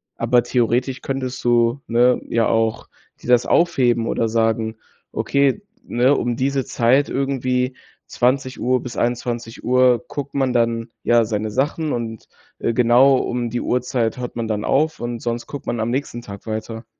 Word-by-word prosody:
Aber 120 Hz, +1 st, +2 dB
theoretisch 125 Hz, +2 st, 0 dB
könntest 130 Hz, -1 st, -4 dB
du, 120 Hz, +2 st, +2 dB
ne, 120 Hz, +2 st, +3 dB
ja 115 Hz, -1 st, +1 dB
auch 115 Hz, -1 st, 0 dB, 0.3 s
dir -, -, -11 dB
das 125 Hz, -1 st, +4 dB
aufheben 125 Hz, -9 st, +2 dB
oder 115 Hz, -, 0 dB
sagen: 110 Hz, 0 st, 0 dB, 0.3 s
„Okay, 140 Hz, +6 st, +1 dB, 0.2 s
ne, 125 Hz, +4 st, +2 dB
um 120 Hz, -1 st, -1 dB
diese 135 Hz, 0 st, 0 dB
Zeit 130 Hz, +5 st, +2 dB
irgendwie 130 Hz, -1 st, -1 dB, 0.3 s
20:00 130 Hz, 0 st, 0 dB
bis 125 Hz, -, -8 dB
21:00 120 Hz, +1 st, +1 dB
guckt 140 Hz, -1 st, -6 dB
man 135 Hz, -2 st, +1 dB
dann, 115 Hz, -1 st, 0 dB
ja, 120 Hz, -1 st, +4 dB
seine 110 Hz, -1 st, -2 dB
Sachen. 150 Hz, +6 st, -1 dB
Und, 115 Hz, -2 st, -5 dB, 0.3 s
äh, 115 Hz, -, -1 dB
genau 125 Hz, +3 st, +5 dB
um 120 Hz, -2 st, -2 dB
die 120 Hz, -, -2 dB
Uhrzeit 125 Hz, -2 st, -1 dB
hört 125 Hz, -1 st, -6 dB
man 115 Hz, -1 st, -3 dB
dann 105 Hz, -1 st, -2 dB
auf 155 Hz, +3 st, +1 dB
und 120 Hz, 0 st, -4 dB
sonst 120 Hz, 0 st, -3 dB
guckt 145 Hz, +1 st, -8 dB
man 120 Hz, -, -2 dB
am 110 Hz, +1 st, -1 dB
nächsten 125 Hz, -3 st, -3 dB
Tag 100 Hz, 0 st, -10 dB
weiter.“ 110 Hz, +1 st, -5 dB
120 Hz, 160 wpm, -21 LUFS, 115-130 Hz, 0.3 s, genau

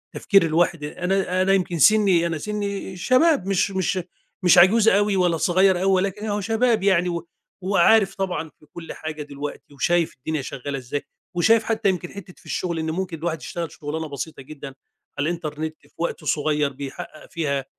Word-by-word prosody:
تفكير 195 Hz, -4 st, +4 dB
الواحد 165 Hz, -1 st, +1 dB
أ 150 Hz, +4 st, -7 dB
أنا 185 Hz, 0 st, +1 dB
أنا 195 Hz, +1 st, +3 dB
يمكن 180 Hz, -3 st, 0 dB
سني 190 Hz, -1 st, +5 dB
أنا 165 Hz, -1 st, -2 dB
سني 200 Hz, 0 st, -4 dB
شباب 255 Hz, -, +3 dB
مش 195 Hz, +1 st, +1 dB
مش 190 Hz, 0 st, 0 dB, 0.4 s
مش 180 Hz, -, +6 dB
عجوز 210 Hz, +5 st, +6 dB
أوي 205 Hz, 0 st, +2 dB
ولا 180 Hz, -3 st, +2 dB
صغير 185 Hz, +2 st, +3 dB
أوي، 195 Hz, -, +3 dB
ولكن 195 Hz, +2 st, 0 dB
أهو 210 Hz, -1 st, -1 dB
شباب 225 Hz, +1 st, +1 dB
يعني 180 Hz, -3 st, +3 dB
و 170 Hz, -1 st, -4 dB, 0.3 s
وعارف 195 Hz, +2 st, +4 dB
طبعًا 180 Hz, -4 st, -3 dB
في 150 Hz, -, -24 dB
كل 170 Hz, -1 st, -8 dB
حاجة 155 Hz, -1 st, -6 dB
دلوقتي 145 Hz, 0 st, -8 dB
وشايف 170 Hz, +4 st, +1 dB
الدنيا 155 Hz, +3 st, -3 dB
شغالة 135 Hz, +1 st, -5 dB
ازاي، 130 Hz, +2 st, -4 dB, 0.3 s
وشايف 220 Hz, +5 st, +4 dB
حتى 220 Hz, -2 st, +1 dB
يمكن 180 Hz, -2 st, -2 dB
حتة 195 Hz, -2 st, -10 dB
في -, -, -22 dB
الشغل 170 Hz, -2 st, -2 dB
إن 160 Hz, 0 st, -2 dB
ممكن 180 Hz, -1 st, -3 dB
الواحد 160 Hz, -1 st, -3 dB
يشتغل 170 Hz, -3 st, -5 dB
شغلانة 160 Hz, +1 st, -5 dB
بسيطة 145 Hz, +1 st, -6 dB
جدًا 140 Hz, 0 st, -9 dB, 0.5 s
على 145 Hz, +3 st, 0 dB
الإنترنت 155 Hz, -2 st, -4 dB
في -, -, -24 dB
وقت 170 Hz, -1 st, -3 dB
صغيّر 150 Hz, -1 st, +1 dB
بيحقق 140 Hz, +3 st, -9 dB
فيها 140 Hz, -5 st, -2 dB
175 Hz, 180 wpm, -23 LUFS, 155-195 Hz, 0.5 s, مش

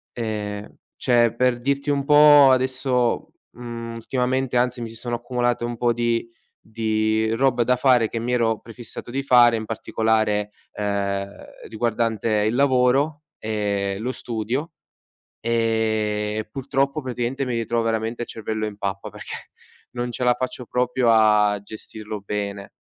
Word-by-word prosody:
Ehm, 105 Hz, -3 st, -4 dB, 0.2 s
cioè 120 Hz, -2 st, +3 dB
per 125 Hz, 0 st, +2 dB
dirti 140 Hz, +3 st, -1 dB
un 140 Hz, -1 st, 0 dB
po' 145 Hz, -2 st, +8 dB
adesso 130 Hz, -1 st, +1 dB, 0.2 s
mhmm, 115 Hz, -1 st, -7 dB
ultimamente 125 Hz, +2 st, -1 dB
anzi, 125 Hz, 0 st, +1 dB
mi 115 Hz, -, -4 dB
si 115 Hz, -, -11 dB
sono 120 Hz, +1 st, -3 dB
accumulate 120 Hz, 0 st, -1 dB
un 120 Hz, 0 st, -3 dB
po' 120 Hz, 0 st, +2 dB
di 115 Hz, 0 st, -1 dB, 0.4 s
di 110 Hz, 0 st, 0 dB
roba 125 Hz, 0 st, +2 dB
da 125 Hz, -, +3 dB
fare 125 Hz, -3 st, +4 dB
che 115 Hz, -, -4 dB
mi 120 Hz, +2 st, -3 dB
ero 115 Hz, -2 st, +2 dB
prefissato 120 Hz, 0 st, -10 dB
di 135 Hz, +2 st, -1 dB
fare 120 Hz, -3 st, +5 dB
in 110 Hz, -, -5 dB
particolare, 110 Hz, -2 st, 0 dB, 0.2 s
ehm, 100 Hz, -1 st, -2 dB, 0.4 s
riguardante 115 Hz, -1 st, -1 dB, 0.2 s
il 110 Hz, -, 0 dB
lavoro 140 Hz, +3 st, +2 dB
e 100 Hz, -2 st, -2 dB
lo 125 Hz, +3 st, -3 dB
studio, 120 Hz, +7 st, -3 dB, 0.7 s
ehm, 110 Hz, -2 st, 0 dB
purtroppo 140 Hz, +2 st, -1 dB
praticamente 125 Hz, +1 st, -2 dB
mi 125 Hz, -2 st, -1 dB
ritrovo 115 Hz, 0 st, 0 dB
veramente 115 Hz, +1 st, -2 dB
il -, -, -6 dB
cervello 110 Hz, 0 st, -3 dB
in 105 Hz, -, -6 dB
pappa 100 Hz, -1 st, -4 dB
perché -, -, -9 dB, 0.4 s
non 120 Hz, 0 st, -3 dB
ce 125 Hz, -, -5 dB
la 125 Hz, 0 st, +4 dB
faccio 125 Hz, -1 st, -5 dB
proprio 125 Hz, 0 st, 0 dB
a 105 Hz, -2 st, +4 dB
gestirlo 110 Hz, 0 st, -8 dB
bene. 100 Hz, 0 st, -4 dB
115 Hz, 145 wpm, -23 LUFS, 110-125 Hz, 0.7 s, po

